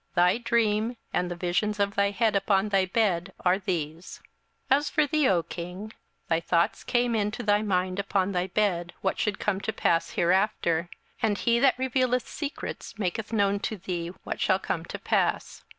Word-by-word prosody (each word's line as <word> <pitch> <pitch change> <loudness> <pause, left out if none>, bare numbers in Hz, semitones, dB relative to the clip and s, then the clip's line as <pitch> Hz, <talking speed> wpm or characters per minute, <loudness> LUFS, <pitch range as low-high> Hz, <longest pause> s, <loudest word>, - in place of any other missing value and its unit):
Thy 180 +5 +4
dream, 230 0 +1 0.2
and 180 - 0
the 175 - -4
visions 180 +4 -1
of 200 0 +1
thy 200 0 +2
head 215 +1 +1
upon 195 +1 +2
thy 195 -2 +2
bed, 190 -4 0
are 180 +2 +4
these; 170 -3 -4 0.5
27:002:029 270 - +7
As 295 - -4
for 300 - +2
thee, 295 -1 +2
O 175 -3 +2
king, 180 +7 -7 0.3
thy 165 -1 +2
thoughts 170 0 +1
came 245 -1 +1
into 210 -1 -1
thy 205 0 +3
mind 185 -2 0
upon 195 -1 0
thy 180 -1 -1
bed, 180 -3 0
what 190 - -1
should 205 -2 0
come 195 -2 -1
to 220 - -2
pass 170 -5 +1
hereafter: 175 -2 +1 0.3
and 215 -3 +1
he 235 +3 +2
that 265 0 +4
revealeth 255 -1 +1
secrets 290 -6 -6
maketh 210 +2 -3
known 200 -2 +2
to 215 0 -3
thee 175 -2 -4 0.2
what - - -5
shall - - +3
come - - -3
to - - -6
pass. - - -1
200 Hz, 180 wpm, -27 LUFS, 180-220 Hz, 0.5 s, 27:002:029